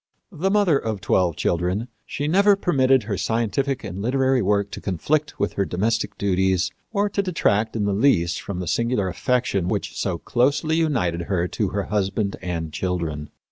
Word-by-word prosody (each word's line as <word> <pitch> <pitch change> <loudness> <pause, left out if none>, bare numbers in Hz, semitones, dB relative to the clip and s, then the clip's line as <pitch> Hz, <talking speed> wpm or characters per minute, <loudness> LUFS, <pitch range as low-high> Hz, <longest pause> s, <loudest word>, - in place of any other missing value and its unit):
The 185 +2 -1
mother 195 -8 +3
of 110 -3 -3
twelve 90 -4 +1
children, 90 +7 -1 0.2
she 145 - -3
never 200 +5 +5
permitted 135 - +3
her 100 -2 -3
scientific 120 +4 -1
and 100 -2 -5
literary 130 +2 +2
work 100 0 +1
to - - -7
conflict 145 - -1
with 100 - 0
her 100 - 0
domestic 110 +5 -1
duties 95 -1 +1 0.2
or 205 -1 +1
to 200 - 0
detract 115 - 0
in 105 -2 0
the 100 - +1
least 95 -6 +2
from 100 - -5
the 90 - -5
singular 115 -3 0
affection 120 -5 0
which 100 +1 -2
so 95 -4 -1
closely 140 - +1
united 120 - 0
her 90 -3 +1
to 105 - -1
her 100 +1 -2
husband 100 0 -1
and 80 -3 -4
children. 80 -5 -3
105 Hz, 175 wpm, -23 LUFS, 95-135 Hz, 0.2 s, never